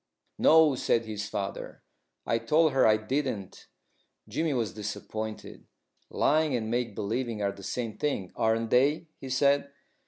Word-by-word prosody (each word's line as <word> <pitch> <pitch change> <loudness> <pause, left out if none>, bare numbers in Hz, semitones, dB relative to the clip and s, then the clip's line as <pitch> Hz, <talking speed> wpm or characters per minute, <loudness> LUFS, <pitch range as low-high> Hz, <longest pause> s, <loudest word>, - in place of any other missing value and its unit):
"No," 160 -2 +6
said 115 -2 +1
his 105 -2 -5
father, 100 -1 -5 0.4
"I 115 - +1
told 155 +7 +3
her 135 - +4
I 110 0 +5
didn't." 110 -3 -3 0.6
Jimmy 160 -1 -1
was 120 -6 -1
disappointed. 110 +1 -6 0.4
"Lying 155 -2 +2
and 110 -2 -2
make 120 -3 -1
believing 115 +1 -2
are 100 - +1
the 100 0 -12
same 110 +3 -4
thing, 120 -11 -2
aren't 115 0 0
they?" 145 +6 +2
he 135 - -8
said. 140 +2 +2
115 Hz, 145 wpm, -28 LUFS, 110-140 Hz, 0.6 s, No